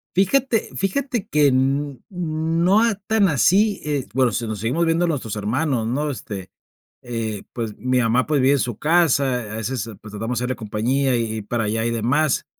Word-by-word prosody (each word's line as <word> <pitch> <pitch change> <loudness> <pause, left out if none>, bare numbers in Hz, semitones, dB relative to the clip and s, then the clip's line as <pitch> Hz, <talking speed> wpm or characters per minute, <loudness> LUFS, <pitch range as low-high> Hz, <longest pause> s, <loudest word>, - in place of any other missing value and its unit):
Fíjate, 225 +4 +2
fíjate 235 +3 -1
que 150 -1 +3
n 135 +2 +1
n 130 - -15
no 170 +3 +1
a 230 -2 +2
tan 205 +1 +1
así, 195 +7 +3
eh, 145 -5 -2
bueno, 130 -2 +3
sí 115 +2 -2
nos 110 -2 -4
seguimos 125 - 0
viendo 165 +1 +2
nuestros 130 -10 -2
hermanos, 115 +3 -1
¿no? 145 +5 -1
Este, 100 -8 -6 0.5
eh, 115 -4 -4
pues, 115 -3 -4
mi 125 +2 +1
mamá, 120 +2 +2
pues, 145 -2 +1
vive 135 +2 +4
en 140 - +2
su 120 -4 -2
casa, 140 -8 +2
a - - -4
veces, 115 0 -3
pues, 105 - -11
tratamos 115 +3 -3
de 125 - -3
hacerle 130 +1 -1
compañía 125 +5 0
y 115 - +1
y 110 - -4
ir 105 - -7
para 115 -1 -1
allá 110 +2 -1
y 115 - 0
demás, 130 +6 +1
130 Hz, 200 wpm, -22 LUFS, 115-165 Hz, 0.5 s, vive